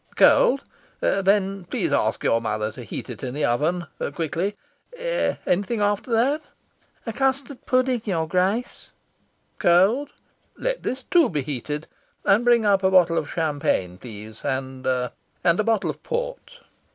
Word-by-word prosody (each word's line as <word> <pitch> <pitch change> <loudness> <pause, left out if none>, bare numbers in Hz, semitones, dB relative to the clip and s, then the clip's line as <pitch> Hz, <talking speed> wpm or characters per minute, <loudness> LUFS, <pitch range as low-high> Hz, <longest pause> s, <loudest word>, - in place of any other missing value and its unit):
"Cold? 275 +2 +5 0.4
Then 195 -1 +1
please - - -1
ask - - +1
your 115 - +2
mother 110 -1 -2
to - - -9
heat - - -6
it - - -8
in 130 0 -4
the 150 - +1
oven 160 +9 0 0.3
quickly. 170 +5 -2 0.4
Anything 240 - -1
after 205 +3 0
that?" 265 +7 +2 0.6
"A 225 - -3
custard 270 +2 -1
pudding, 255 -1 +2
your 165 -6 0
Grace." 190 +8 -1 0.7
"Cold? 200 +12 +4 0.5
Let - - -2
this, 260 +1 -3
too, 340 +2 +4
be 150 -5 -2
heated. 150 +3 -4 0.4
And 205 +4 +4
bring 240 -2 +4
up 200 -2 +4
a 190 - +3
bottle 175 -3 +4
of 150 - -6
champagne, 145 - -1
please; 110 -2 -10
and 130 0 -3
and 130 - -1
a - - +3
bottle 225 -1 +1
of - - -14
port." - - -5
190 Hz, 145 wpm, -24 LUFS, 150-240 Hz, 0.7 s, Cold